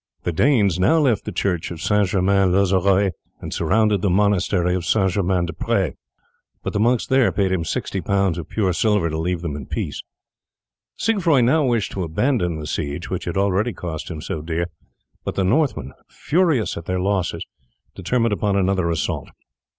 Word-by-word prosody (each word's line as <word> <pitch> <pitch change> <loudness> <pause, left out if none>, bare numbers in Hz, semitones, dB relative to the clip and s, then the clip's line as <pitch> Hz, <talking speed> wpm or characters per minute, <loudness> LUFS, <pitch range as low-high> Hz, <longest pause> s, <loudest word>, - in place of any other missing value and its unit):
The 90 - -1
Danes 100 - +2
now 155 - +4
left 135 -8 +2
the 105 - -4
church 90 -2 -1
of 85 - -7
St. 105 +3 +2
Germain 95 0 +2
L'Auxerrois 95 +1 +3 0.3
and - - -6
surrounded 105 +4 +2
the 100 - +1
monastery 95 -2 +2
of 90 -1 -1
St. 95 +1 +2
Germain 90 -2 0
des 85 - -5
Pres, - - 0 0.7
but - - -3
the 105 - 0
monks 120 +2 +2
there 130 -2 +3
paid 95 -2 0
him 90 -3 0
sixty 95 +3 -3
pounds 100 -4 0
of 80 - -8
pure 95 -5 0
silver 100 -2 +1
to 80 - -2
leave 85 +1 -1
them 80 -5 -4
in 70 -3 -7
peace. - - -4 1.0
Siegfroi 170 - +2
now 150 +6 +3
wished 120 -5 0
to 95 - -4
abandon 90 - 0
the 75 - -6
siege 70 -1 -4
which - - -3
had - - -3
already 100 +4 +1
cost 80 -3 -6
him 80 -3 -6
so 80 - -4
dear, 85 +2 -3 0.5
but - - -4
the 95 - +1
Northmen, 140 +10 0 0.2
furious 160 - +1
at 85 - -7
their 90 +1 -1
losses, 95 -1 -1 0.5
determined 115 +4 0
upon 100 -1 0
another 95 -3 +1
assault. 85 -2 -2
95 Hz, 180 wpm, -21 LUFS, 85-110 Hz, 1.0 s, now